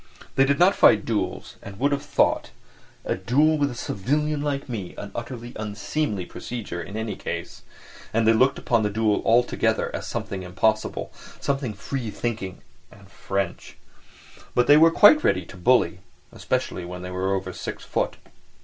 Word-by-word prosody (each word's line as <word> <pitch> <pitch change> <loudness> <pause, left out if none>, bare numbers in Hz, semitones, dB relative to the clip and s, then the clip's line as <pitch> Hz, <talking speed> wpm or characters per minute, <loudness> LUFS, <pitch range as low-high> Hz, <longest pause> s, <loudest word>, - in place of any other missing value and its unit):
They 135 - +5
did 140 +1 +2
not 180 +4 +5
fight 105 -2 +5
duels 110 -3 -3
and 100 -1 -10
would 140 +5 +1
have 140 0 0
thought 145 - +1 0.6
a - - 0
duel 145 +11 +2
with 145 -1 +2
a 125 - -7
civilian 145 +8 -1
like 145 -1 -2
me 105 -8 -5
an 100 - -7
utterly 120 0 -6
unseemly 105 - -2
procedure 105 -7 -6
in 100 +5 -7
any 110 -1 -3
case—and 110 0 -5
they 115 - +7
looked 130 +4 +3
upon 115 -2 +1
the 105 - +1
duel 105 0 +1
altogether 120 +2 +2
as - - -5
something 95 -1 -4
impossible, 110 +4 -1 0.3
something 135 -6 -2
free 120 +3 -4
thinking 105 -5 -4 0.3
and - - -17
French. 95 -2 -4 0.8
But 125 - +4
they 145 - +7
were 160 +2 +7
quite 205 - +7
ready 90 -2 +2
to - - -12
bully, 90 - +2 0.3
especially 90 - -2
when 90 +1 -7
they 90 - -6
were 95 +1 0
over 95 -1 -4
six - - -6
foot. - - -1
115 Hz, 165 wpm, -24 LUFS, 100-140 Hz, 0.8 s, they